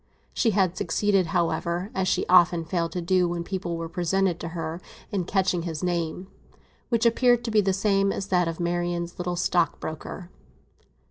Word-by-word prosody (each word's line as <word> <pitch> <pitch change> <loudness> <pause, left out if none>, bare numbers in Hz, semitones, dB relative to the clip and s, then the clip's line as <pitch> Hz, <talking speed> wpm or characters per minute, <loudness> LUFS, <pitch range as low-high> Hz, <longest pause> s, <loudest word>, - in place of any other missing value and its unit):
She 235 - +2
had 190 -4 +1
succeeded, 195 +1 +1
however, 175 +2 -1
as 190 -1 -1
she - - +1
often 175 -2 +5
failed 170 -1 -1
to 180 - -3
do 180 +1 +2
when 170 0 -3
people 175 -2 -4
were 165 0 -4
presented 180 +1 0
to 170 - -5
her, 165 +1 -4 0.3
in 190 -4 -1
catching 185 -2 +1
his 165 -1 -5
name, 175 0 -2 0.6
which 235 -2 +1
appeared 240 +1 +4
to 235 - -3
be 215 -1 +4
the 195 -1 +1
same 195 0 +2
as 195 - -3
that 180 -2 +2
of 165 0 -4
Marian's 175 0 -2
little 180 0 -2
stockbroker. 175 0 -2
180 Hz, 175 wpm, -25 LUFS, 170-195 Hz, 0.6 s, often